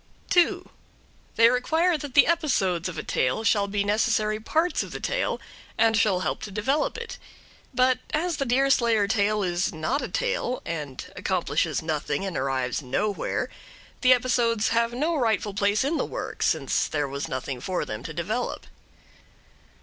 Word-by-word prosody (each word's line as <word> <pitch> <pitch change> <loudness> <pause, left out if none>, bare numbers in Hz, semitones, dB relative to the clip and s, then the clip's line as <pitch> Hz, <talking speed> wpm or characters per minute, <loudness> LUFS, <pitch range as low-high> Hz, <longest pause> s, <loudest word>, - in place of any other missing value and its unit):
2. 350 -2 +3 0.7
They 230 +1 +6
require 320 +8 +2
that 290 -3 -6
the 280 - +8
episodes 195 - +1
of 165 - -8
a - - -3
tale 130 +12 0
shall 205 -2 +2
be 200 0 0
necessary 215 0 +1
parts 320 +10 0
of - - -6
the - - -5
tale, - - -1 0.4
and 225 0 +4
shall 195 -4 +2
help - - -2
to 215 - -6
develop 240 - 0
it. 470 0 -7 0.5
But 255 0 +3
as 330 +1 0
the 275 - -1
Deerslayer 240 -4 +3
tale 210 -1 +1
is 175 0 0
not 165 - -1
a - - -3
tale, - - -1
and 150 -6 -5
accomplishes - - 0
nothing 155 +2 -2
and 190 -4 -4
arrives 130 -1 -1
nowhere, 190 +10 -1 0.5
the 255 - +5
episodes 240 -3 +2
have 230 0 +2
no 305 +8 0
rightful 220 -6 0
place 205 +3 +2
in 305 +4 0
the - - 0
work, - - -6
since - - +1
there 145 -2 -1
was 140 +1 -4
nothing 130 -1 -4
for 185 -1 -2
them 105 +1 -5
to 150 - -7
develop. 195 +10 -3
220 Hz, 165 wpm, -26 LUFS, 180-260 Hz, 0.7 s, the